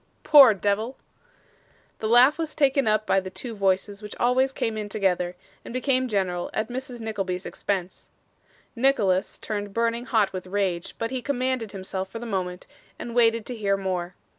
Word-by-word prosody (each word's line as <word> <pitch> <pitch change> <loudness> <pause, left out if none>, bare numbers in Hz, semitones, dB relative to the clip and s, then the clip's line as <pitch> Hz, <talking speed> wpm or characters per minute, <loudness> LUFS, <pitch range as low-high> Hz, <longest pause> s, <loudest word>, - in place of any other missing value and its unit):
Poor 275 -8 +8
deyvle!' 205 +6 -1 1.0
The 215 - -2
laugh 250 +7 +6
was 320 -2 -3
taken 275 -4 +2
up 215 0 +2
by 195 - +3
the 190 0 -6
two 230 +4 -7
voices 200 +1 0
which 210 -1 -8
always 255 +2 +3
came 225 -4 -2
in 210 -1 -4
together, 180 -4 0 0.3
and - - -9
became 255 0 +1
general 185 -5 -1
at 215 +2 -1
Mrs. 250 0 -6
Nickleby's 195 -4 -3
expense. 185 -2 -4 0.7
Nicholas 220 -7 +2
turned 205 -2 -5
burning 230 +1 0
hot 220 -6 +1
with 185 0 -6
rage, 185 -3 -2
but 230 +1 -3
he 260 -1 -2
commanded 255 -4 -1
himself 190 -1 -5
for 230 - -7
the 235 - -6
moment, 185 -4 -3 0.3
and 235 - -7
waited 230 -2 +3
to 250 - -5
hear 200 -3 0
more. 185 -2 -3
215 Hz, 170 wpm, -25 LUFS, 190-245 Hz, 1.0 s, Poor